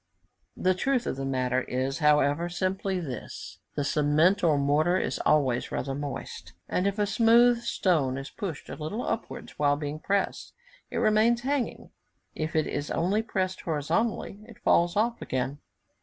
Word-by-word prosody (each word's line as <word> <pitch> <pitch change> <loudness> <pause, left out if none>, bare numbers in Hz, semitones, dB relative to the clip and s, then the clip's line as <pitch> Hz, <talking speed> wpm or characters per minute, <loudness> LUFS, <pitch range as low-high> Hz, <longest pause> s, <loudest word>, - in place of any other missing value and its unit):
The 185 0 +2
truth 250 +6 0
of - - -2
the 135 0 -4
matter 130 -1 0
is, 130 +3 -2
however, 150 +2 +3
simply 190 +2 -1
this: 130 -9 -7 0.2
the 145 - 0
cement 155 +7 +3
or 155 -4 +4
mortar 150 +6 +2
is - - -2
always 130 -5 +2
rather 135 +1 -2
moist, 140 0 -6
and 180 - 0
if 200 +1 -1
a 210 - +2
smooth 235 +3 +4
stone 150 - +1
is 135 0 -7
pushed 175 -8 -6
a - - -6
little 160 +10 -4
upwards 230 - -5
while 145 -1 +3
being 150 +1 -4
pressed, 200 +4 -1 0.4
it - - -4
remains 230 +1 +3
hanging; 270 -1 -2 0.4
if 155 +1 -4
it 155 -1 +3
is 145 - -3
only 190 +6 +1
pressed 185 -4 -2
horizontally, 170 +7 -1
it 235 - -13
falls 170 +2 +3
off 230 +3 +1
again. 130 +2 -2
170 Hz, 160 wpm, -27 LUFS, 145-205 Hz, 0.4 s, or